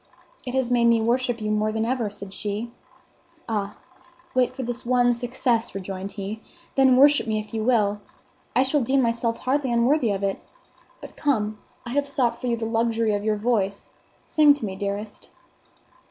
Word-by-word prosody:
"It 250 - -3
has 260 -2 0
made 240 -1 +3
me 235 -1 +5
worship 240 +1 0
you 215 -1 -2
more 215 0 +1
than 220 +1 -1
ever," 240 -3 -1
said 200 -1 -9
she. 210 +4 -4 0.8
"Ah, 205 -2 -3 0.6
wait 255 -1 +2
for 260 +1 -6
this 245 +1 -5
one 245 0 +3
success," 240 -1 -1
rejoined 195 0 -5
he, 205 +2 -6 0.3
"then 265 -2 +5
worship 285 -1 +6
me 215 -1 0
if 215 +1 -9
you 220 -1 -1
will. 210 -4 +2 0.5
I 255 - +5
shall 275 +2 +1
deem 265 +2 +2
myself 230 0 0
hardly 265 0 0
unworthy 240 +2 +3
of 200 -1 -2
it. 195 -1 -1 0.6
But - - -11
come, 215 -7 0 0.3
I 235 - -6
have 285 +2 0
sought 255 -4 -1
you 240 -2 0
for 225 - -3
the 225 - -4
luxury 230 -1 +1
of 205 0 -1
your 215 0 +1
voice. 205 -3 -1 0.3
Sing 300 -2 +5
to 285 - -5
me, 190 -2 -5
dearest." 200 +2 -5
230 Hz, 185 wpm, -24 LUFS, 210-255 Hz, 0.8 s, worship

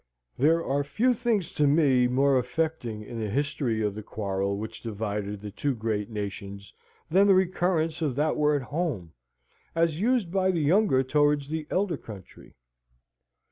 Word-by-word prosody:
There 165 +5 +2
are 140 +1 0
few 235 - +1
things 220 -6 -1
to 150 - +2
me 140 -4 +4
more 135 +1 +3
affecting 125 -7 -3
in 115 +1 -7
the 110 -2 -2
history 130 -3 -1
of 105 -1 0
the 110 - -6
quarrel 100 -2 -2
which 110 +2 -7
divided 105 -2 -4
the 105 -1 -7
two 140 +6 -2
great 110 -2 -2
nations 100 -2 -6 0.4
than 195 +4 +5
the 195 - +6
recurrence 175 -3 +1
of 145 -6 0
that 150 +3 +1
word 150 -2 +2
Home, 135 - -3 0.6
as 165 0 +1
used 230 -6 +1
by 190 0 +2
the 180 -3 +1
younger 155 -3 +3
towards 145 +1 +1
the 155 -1 -4
elder 185 -4 0
country. 100 -8 -12
140 Hz, 160 wpm, -27 LUFS, 110-165 Hz, 0.6 s, the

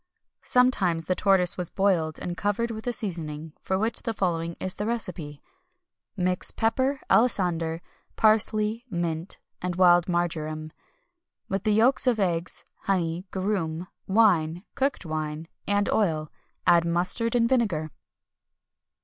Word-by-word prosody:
[XXI - - -19
258] - - -8
Sometimes 190 -10 +3
the 185 - +1
tortoise 190 -3 +3
was 180 -2 -3
boiled, 180 -6 0
and 175 - -5
covered 210 +5 -1
with 220 +1 -7
a - - +2
seasoning, 160 -8 -4
for 190 - -1
which 220 +4 -1
the 230 - -3
following 170 -3 -1
is 185 - -1
the 210 - -4
recipe: 175 -11 -3 0.7
Mix 180 0 0
pepper, 260 +5 0
alisander, 175 -8 +1 0.3
parsley, 215 +1 +4
mint, 170 -2 -3 0.2
and 180 -1 -3
wild 175 -1 +4
marjoram, 155 -3 -2 0.8
with 195 +2 -2
the 215 - +3
yolks 250 +5 +4
of 240 -3 +2
eggs, 175 -3 -1
honey, 180 -1 -2
garum, 185 -4 -2 0.2
wine, 180 -5 +2
cooked 275 -7 -1
wine, 155 0 -4 0.2
and 205 0 +1
oil; 160 -8 0 0.3
add 170 -1 +5
mustard 180 +8 +2
and 230 -1 +3
vinegar. 205 -12 0
185 Hz, 135 wpm, -26 LUFS, 165-215 Hz, 0.8 s, add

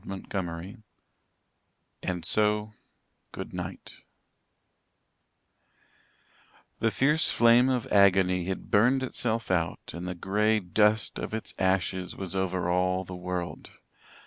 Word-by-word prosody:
CHAPTER 95 +1 -5
XXIII 90 +4 -6 1.2
"AND 90 -2 -3
SO, 105 0 +1 0.6
GOODNIGHT" - - -7 2.8
The 115 - +2
fierce 150 +7 +2
flame 120 +2 +5
of 125 -3 0
agony 95 -3 +4
had 95 +1 -5
burned 125 +6 +4
itself 115 -4 -2
out 85 -2 -1
and 85 +2 -6
the 90 - -4
grey 105 +5 +1
dust 105 +3 +1
of - - -4
its 110 - -5
ashes 95 -1 0
was 95 -2 -6
over 95 -2 -1
all 90 +1 +1
the 90 - -7
world. 90 -1 -5
95 Hz, 110 wpm, -28 LUFS, 90-110 Hz, 2.8 s, flame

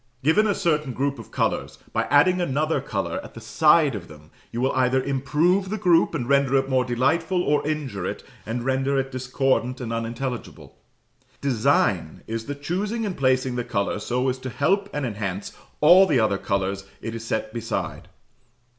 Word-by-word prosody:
Given 200 +9 +4
a 205 - +1
certain 150 -8 0
group 140 +2 -1
of - - -10
colours, - - -1 0.2
by - - +1
adding 180 +7 +4
another 155 0 0
colour - - -3
at - - -12
the - - -7
side 155 -2 +4
of 100 -5 -6
them, 75 0 -15 0.2
you 115 - -4
will 130 +2 +2
either 130 0 +2
improve 155 +8 +1
the 215 - -2
group 175 -5 +3
and 125 -6 -2
render 140 -1 +3
it 135 0 +2
more 130 -1 +2
delightful, 165 +9 +1
or 150 -3 +1
injure 140 -12 -3
it, - - -5 0.2
and 120 +2 -4
render 135 +1 +1
it 135 0 -1
discordant 130 0 0
and 115 -2 -4
unintelligible. 115 +2 -5 0.6
"Design" 130 -6 +1
is 115 0 -4
the 145 - -3
choosing 200 +10 -2
and 195 -3 -3
placing 130 -1 +1
the 120 - -1
colour 100 -4 -1
so 125 +5 -1
as 130 0 -1
to 130 - -6
help 190 +11 +1
and 145 -2 -2
enhance 100 -4 -4 0.3
all 180 +5 +8
the 140 -7 +3
other 105 -3 +1
colours 100 -1 -1 0.2
it 115 - -4
is 115 -1 -6
set 110 -1 -3
beside. 115 -1 -4
130 Hz, 180 wpm, -24 LUFS, 120-155 Hz, 0.6 s, all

